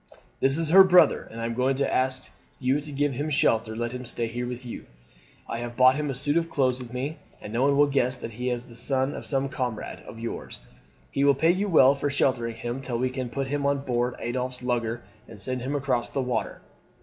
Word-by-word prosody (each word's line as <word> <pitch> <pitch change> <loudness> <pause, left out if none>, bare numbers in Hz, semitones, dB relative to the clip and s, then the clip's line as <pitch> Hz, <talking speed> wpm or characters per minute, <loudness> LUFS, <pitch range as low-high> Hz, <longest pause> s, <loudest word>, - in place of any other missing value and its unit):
This 135 +2 +3
is 165 -2 0
her 190 +4 +9
brother, 180 -4 +5
and 115 - -9
I 115 - -2
am 115 - -2
going 130 +3 +1
to 140 +1 0
ask 130 0 0 0.3
you 135 +3 +1
to 150 0 -8
give 145 0 0
him 145 +5 -2
shelter 115 -6 +2
and 110 - -6
let 120 0 -1
him 125 0 -6
stay 120 -1 -3
here 120 +2 -4
with 125 +1 -6
you. 120 - -8 0.6
I 115 - -4
have 120 0 -6
brought 130 0 +7
him 150 0 -2
a 135 - -2
suit 145 +4 +1
of 165 0 0
clothes 130 -2 +1
with 125 -2 -8
me, 140 +5 -4 0.2
and 105 - -8
no 120 - 0
one 140 +1 +3
will 145 - +6
guess 135 -2 +1
that 115 -2 -7
he 125 +3 -3
is 120 -1 -2
not 125 - -18
the 115 - -13
son 135 +2 0
of - - -6
some 135 -1 0
comrade 125 -5 -4
of - - -9
yours. 115 +1 -6 0.5
He 140 - 0
will 140 -1 +5
pay 160 +5 +4
you 195 +3 -1
well 140 -6 +6
for 140 +1 -2
sheltering 120 -4 0
him 120 +3 -4
till 125 -3 -3
we 130 +1 0
can 130 -2 -4
put 135 +3 -2
him 145 +1 -2
on 140 0 0
board 120 0 0
Adolphe's 125 +1 -3
lugger 120 -2 -1 0.2
and 110 -2 -10
send 130 +3 -2
him 135 +4 -2
across 130 -4 0
the - - -3
water. 125 -3 -2
130 Hz, 250 wpm, -26 LUFS, 120-140 Hz, 0.6 s, her